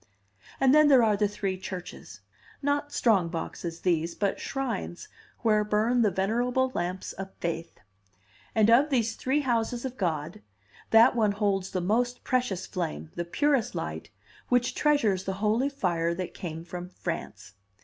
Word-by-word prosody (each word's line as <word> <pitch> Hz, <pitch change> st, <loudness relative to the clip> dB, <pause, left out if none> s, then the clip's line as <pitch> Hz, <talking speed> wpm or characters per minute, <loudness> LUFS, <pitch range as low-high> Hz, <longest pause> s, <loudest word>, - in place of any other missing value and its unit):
And 265 Hz, 0 st, +5 dB
then 305 Hz, 0 st, +7 dB
there 265 Hz, -4 st, +6 dB
are 215 Hz, -2 st, +3 dB
the 205 Hz, 0 st, +2 dB
three 195 Hz, -2 st, -3 dB
churches. 180 Hz, -, -8 dB, 0.4 s
Not 285 Hz, +1 st, 0 dB
strong 200 Hz, -11 st, +2 dB
boxes, 165 Hz, 0 st, -5 dB
these, 170 Hz, -2 st, 0 dB
but 200 Hz, -1 st, -1 dB
shrines, 235 Hz, -10 st, -4 dB, 0.3 s
where 215 Hz, -2 st, +3 dB
burn 215 Hz, +4 st, +2 dB
the 215 Hz, -, +4 dB
venerable 240 Hz, +7 st, 0 dB
lamps 180 Hz, +2 st, -3 dB
of 195 Hz, 0 st, -7 dB
faith. 170 Hz, 0 st, -4 dB, 0.8 s
And 220 Hz, 0 st, +5 dB
of 270 Hz, +6 st, +5 dB
these 230 Hz, -5 st, +1 dB
three 270 Hz, +3 st, 0 dB
houses 240 Hz, -1 st, -1 dB
of 260 Hz, 0 st, -5 dB
God, 155 Hz, -, -2 dB, 0.5 s
that 230 Hz, +3 st, +6 dB
one 215 Hz, -3 st, +2 dB
holds 200 Hz, -2 st, 0 dB
the 185 Hz, -, -2 dB
most 240 Hz, +6 st, 0 dB
precious 245 Hz, -8 st, 0 dB
flame, 160 Hz, -3 st, -4 dB
the 175 Hz, -, -3 dB
purest 270 Hz, -, +1 dB
light, -, -, -5 dB, 0.4 s
which 245 Hz, -1 st, +2 dB
treasures 225 Hz, -11 st, +2 dB
the 190 Hz, -, -1 dB
holy 215 Hz, +7 st, +1 dB
fire 170 Hz, -10 st, -1 dB
that 185 Hz, 0 st, -5 dB
came 165 Hz, -2 st, -6 dB
from 180 Hz, +1 st, -7 dB
France. 140 Hz, -, -6 dB
210 Hz, 155 wpm, -28 LUFS, 180-245 Hz, 0.8 s, then